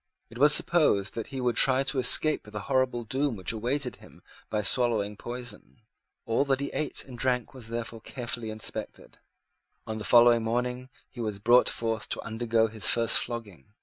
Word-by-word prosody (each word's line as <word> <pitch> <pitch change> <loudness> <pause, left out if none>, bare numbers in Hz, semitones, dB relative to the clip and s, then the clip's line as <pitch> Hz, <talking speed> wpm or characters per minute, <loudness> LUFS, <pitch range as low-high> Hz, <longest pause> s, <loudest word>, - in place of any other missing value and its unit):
It 115 - -10
was 145 +1 +6
supposed 150 - +4
that 115 - -5
he 135 -2 -7
would 125 -2 0
try 135 0 +4
to 135 -1 -1
escape 150 +3 +5
the 105 0 -6
horrible 130 -1 0
doom 135 +3 -2
which 95 -3 -3
awaited 125 +4 -2
him - - -18 0.3
by 105 0 -2
swallowing 105 -2 +1
poison. 120 +1 -8 0.4
All 115 +4 +1
that 135 -1 0
he 140 - -4
ate 155 - -3
and 130 - -11
drank 125 -2 -1
was 125 -4 -11
therefore 115 -1 -6
carefully 120 -2 -5
inspected. 110 0 -6 0.7
On 110 0 -5
the - - -6
following 120 +1 +5
morning 125 +3 -3 0.2
he 120 - -9
was 105 -3 -3
brought 120 +5 +4
forth 115 -2 -3
to - - -3
undergo 115 0 0
his 110 -2 -1
first 115 -1 +3
flogging. 105 - -7
120 Hz, 180 wpm, -27 LUFS, 110-130 Hz, 0.7 s, was